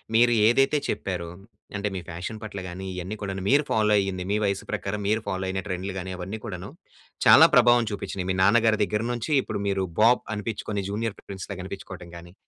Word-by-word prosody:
మీరు 120 Hz, +1 st, +5 dB, 0.2 s
ఏదైతే 135 Hz, +5 st, +4 dB
చెప్పారో 90 Hz, -3 st, -3 dB, 0.5 s
అంటే, 105 Hz, +1 st, -1 dB
మీ -, -, -2 dB
ఫ్యాషన్ 90 Hz, +7 st, -6 dB
పట్ల 100 Hz, -2 st, -6 dB
గాని 95 Hz, +2 st, -7 dB
ఇవన్నీ 90 Hz, +4 st, -5 dB
కూడా 95 Hz, -1 st, -3 dB, 0.2 s
మీరు 145 Hz, +3 st, +5 dB
ఫాలో 105 Hz, -1 st, +3 dB
అయ్యింది. 95 Hz, -2 st, -2 dB
మీ 105 Hz, -, +2 dB
వయసు 100 Hz, 0 st, -1 dB
ప్రకారం 105 Hz, +1 st, -3 dB
మీరు 110 Hz, +1 st, +1 dB
ఫాలో 95 Hz, 0 st, -2 dB
అయిన 95 Hz, 0 st, -2 dB
ట్రెండ్‌లు 95 Hz, 0 st, -3 dB
గాని 95 Hz, +1 st, -5 dB
అవన్నీ 95 Hz, +5 st, -5 dB
కూడాను 90 Hz, -3 st, -6 dB, 0.6 s
చాలా -, -, +9 dB
ప్రభావం 120 Hz, -1 st, +6 dB
చూపించినయి. 100 Hz, -2 st, -4 dB
మీ -, -, -1 dB
నాన్నగారి 110 Hz, +1 st, +4 dB
దగ్గర 105 Hz, +2 st, -1 dB
నుంచి 120 Hz, +5 st, -3 dB
ఇప్పుడు 100 Hz, -, -4 dB
మీరు 95 Hz, -1 st, 0 dB, 0.2 s
బాబ్ 120 Hz, +3 st, +5 dB
అనిపించుకొని 105 Hz, -1 st, -3 dB
'జూనియర్ 110 Hz, +1 st, -3 dB
ప్రిన్స్' 95 Hz, -2 st, -7 dB
లాగా 95 Hz, -, -6 dB
కనిపించుకోవడం 95 Hz, -2 st, -8 dB
గాని. 85 Hz, +1 st, -13 dB
100 Hz, 190 wpm, -25 LUFS, 95-110 Hz, 0.6 s, చాలా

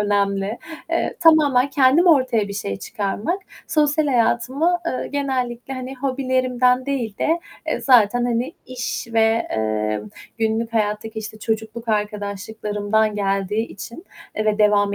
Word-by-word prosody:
önemli. 200 Hz, +1 st, 0 dB, 0.3 s
Eee, -, -, -1 dB
tamamen 290 Hz, -5 st, +5 dB
kendim 275 Hz, +6 st, +4 dB
ortaya 255 Hz, -9 st, +3 dB
bir 200 Hz, -, -5 dB
şey 100 Hz, -, -3 dB
çıkarmak, 215 Hz, -, -3 dB, 0.2 s
sosyal 300 Hz, 0 st, +2 dB
hayatımı, 265 Hz, +7 st, +2 dB
eee, 255 Hz, -, -2 dB
genellikle, 265 Hz, -3 st, -2 dB
hani, 255 Hz, +1 st, -6 dB
hobilerimden 255 Hz, -1 st, +1 dB
değil 245 Hz, -7 st, -2 dB
de, 330 Hz, +2 st, +1 dB, 0.3 s
eee, -, -, -1 dB
zaten, 245 Hz, -2 st, +4 dB
hani, 245 Hz, +5 st, -1 dB
iş 250 Hz, -2 st, -4 dB
ve, 225 Hz, 0 st, +3 dB
eee, 110 Hz, -1 st, -1 dB, 0.4 s
günlük 225 Hz, +1 st, 0 dB
hayattaki, 220 Hz, 0 st, -1 dB
işte, 215 Hz, 0 st, -7 dB
çocukluk 220 Hz, +1 st, -3 dB
arkadaşlıklarımdan 210 Hz, 0 st, -1 dB
geldiği 200 Hz, +2 st, 0 dB
için, 235 Hz, -, -9 dB, 0.3 s
eee, 215 Hz, -, 0 dB
ve 215 Hz, -1 st, +1 dB
devam 205 Hz, -1 st, +3 dB
230 Hz, 130 wpm, -21 LUFS, 210-260 Hz, 0.4 s, tamamen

